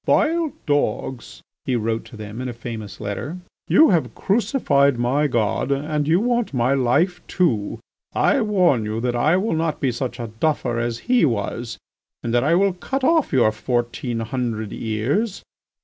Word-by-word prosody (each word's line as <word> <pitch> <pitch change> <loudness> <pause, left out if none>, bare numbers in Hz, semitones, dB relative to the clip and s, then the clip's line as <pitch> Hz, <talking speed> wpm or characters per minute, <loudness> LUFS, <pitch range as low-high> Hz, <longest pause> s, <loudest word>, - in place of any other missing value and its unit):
"Vile 330 -2 +2
dogs," 135 -4 -2 0.2
he 130 - -1
wrote 115 0 -1
to 115 - -12
them 110 +3 -7
in 130 - -3
a - - -5
famous 110 -4 -7
letter, 110 - -4 0.3
"you 315 - +6
have 170 -4 0
crucified 145 - +2
my 130 +5 +1
God 120 0 0
and 145 +1 -1
you 165 +3 +4
want 240 - 0
my 125 +2 +2
life 160 +8 +1
too; 120 - 0 0.3
I - - +2
warn 180 - +3
you 110 +1 -3
that 120 +1 -1
I 155 +9 +3
will 200 +1 0
not 160 -1 -1
be 130 - +1
such 120 0 -4
a 115 -2 -5
duffer 125 -6 0
as 120 0 -3
He 250 -1 +4
was 115 -2 -1 0.5
and 115 - -2
that 120 0 +3
I 160 +4 +3
will 195 +1 +3
cut 260 +9 -4
off 320 +1 +3
your 120 -5 +4
fourteen 120 +1 -2
hundred 115 -3 -3
ears. 130 - -1
130 Hz, 170 wpm, -22 LUFS, 115-175 Hz, 0.5 s, you